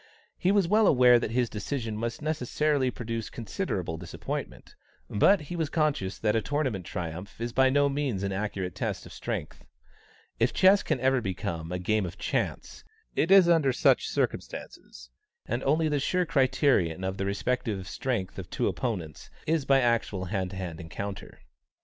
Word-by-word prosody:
He 185 - +3
was 200 -4 +3
well 210 +2 +4
aware 125 -2 +6
that - - -2
his 120 +1 +1
decision 110 +1 -4
must 115 +5 -4
necessarily 150 -2 0
produce 115 -2 -4
considerable 105 - -3
disappointment, 85 - -6 0.4
but 185 - +4
he 150 +4 -6
was 160 -3 -1
conscious 150 - 0
that 105 0 +1
a 110 - +2
tournament 130 - -2
triumph 90 +4 -6
is 120 0 -3
by 130 0 +4
no 145 +1 +3
means 135 -8 -1
an 100 - -1
accurate 95 -2 -3
test - - -3
of - - -11
strength. - - -5 0.8
If 115 +3 +2
chess 190 +1 +6
can - - -1
ever 130 -1 +3
become 85 -5 -4
a 90 - -1
game 100 +2 0
of 90 +2 -9
chance, - - -3 0.3
it 165 - +1
is 195 -2 +8
under 160 -6 +4
such - - +3
circumstances; - - -4 0.3
and 120 +3 -2
the - - -4
only 150 0 +2
sure 180 +6 +1
criterion 130 - +2
of 95 +1 -2
the 95 - -2
respective 100 -2 -2
strengths 100 -8 -3
of 90 - -8
two 120 - -1
opponents 95 - -4 0.2
is 160 -3 +1
by 135 -1 +4
actual 115 -6 0
hand 95 -1 -2
to 95 - -8
hand 90 -3 -5
encounter. 95 -1 -7
120 Hz, 170 wpm, -28 LUFS, 95-145 Hz, 0.8 s, is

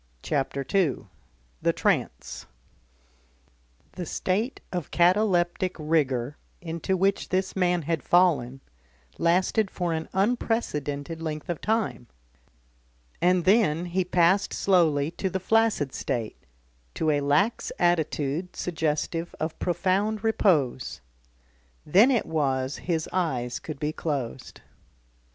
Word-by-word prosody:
CHAPTER 140 -1 -1
II 175 - +1 0.6
THE - - +2
TRANCE - - -1 1.4
The 175 -3 -6
state 215 +8 -1
of 175 -4 -4
cataleptic 180 -1 +2
rigour 145 -4 0 0.2
into 170 +3 -2
which 195 +2 +1
this 190 +1 -1
man 180 -2 +1
had 160 -1 -1
fallen, 145 -8 +2 0.6
lasted 190 +5 +2
for 175 -3 -2
an 160 0 -4
unprecedented 165 - -1
length 155 -1 -5
of 170 - -3
time, 220 - -1 1.1
and 180 0 +3
then 185 -5 +3
he 180 +2 0
passed 180 +3 +2
slowly 160 -6 +2
to 190 +2 -3
the 190 +1 -2
flaccid 215 -8 +2
state, 115 -4 -4 0.5
to 155 - +1
a 145 -1 +1
lax 145 +11 +1
attitude 165 -1 0
suggestive 165 0 -2
of 160 +1 -3
profound 195 +4 0
repose. 155 - +1 0.8
Then 200 - +6
it 245 -6 +2
was 135 -4 -1
his 165 -3 -2
eyes 130 -10 -1
could 155 -3 -7
be 150 0 -2
closed. 135 -7 -4
170 Hz, 110 wpm, -26 LUFS, 150-190 Hz, 1.4 s, Then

